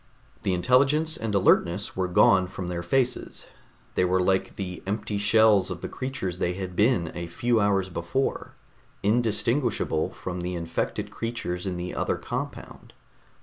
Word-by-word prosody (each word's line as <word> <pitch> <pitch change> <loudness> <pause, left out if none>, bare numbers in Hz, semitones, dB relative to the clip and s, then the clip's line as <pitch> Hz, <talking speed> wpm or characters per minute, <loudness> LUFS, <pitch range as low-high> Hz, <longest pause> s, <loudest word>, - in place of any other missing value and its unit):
The 95 - 0
intelligence 140 - +3
and 110 -2 -3
alertness 95 0 +2
were 95 -1 0
gone 90 +1 +5
from 90 -1 -6
their 85 -1 -3
faces; 125 +8 -1 0.5
they - - +2
were 90 +1 +2
like 95 +1 +1
the 90 -2 -5
empty 105 0 -2
shells 105 -2 +4
of 90 -2 -5
the - - -3
creatures 130 -10 -4
they 90 - 0
had 95 -1 -6
been 105 -5 +2
a 85 0 -5
few 120 +7 +1
hours 100 -2 +2
before, 85 +9 -2 0.5
indistinguishable 115 - +1
from 90 -1 -6
the 90 +1 -3
infected 85 -1 -3
creatures 105 -6 -4
in 90 -2 -2
the 90 +1 -4
other - - 0
compound. - - -6
95 Hz, 150 wpm, -26 LUFS, 90-115 Hz, 0.5 s, gone